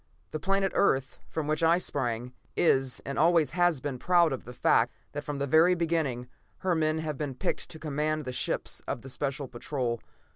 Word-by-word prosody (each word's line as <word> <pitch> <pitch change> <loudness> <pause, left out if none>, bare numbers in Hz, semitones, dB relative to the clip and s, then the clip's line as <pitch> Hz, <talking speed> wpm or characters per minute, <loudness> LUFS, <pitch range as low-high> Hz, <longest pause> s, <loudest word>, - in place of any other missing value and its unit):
The 155 - -3
planet 195 +3 +1
Earth, 135 -8 +2
from 160 - -3
which 155 +1 0
I 165 +1 +5
sprang, 125 -7 -2 0.2
is 135 -7 +2
and 140 0 -3
always 160 -3 +4
has 175 -4 +2
been 130 -1 -4
proud 170 -2 +4
of 130 - -6
the 125 - -8
fact - - +3 0.2
that - - -5
from 145 -1 -4
the 140 - -1
very 160 +6 +5
beginning, 160 -8 -1 0.4
her 185 - +3
men 155 -1 +1
have 155 -3 -3
been 145 -4 -3
picked 185 - -2
to 160 - -8
command 155 0 -1
the 130 - -3
ships 125 - -1
of 120 - -3
the 135 - -8
Special 140 +1 -3
Patrol. 120 -1 -3
150 Hz, 195 wpm, -29 LUFS, 130-165 Hz, 0.4 s, I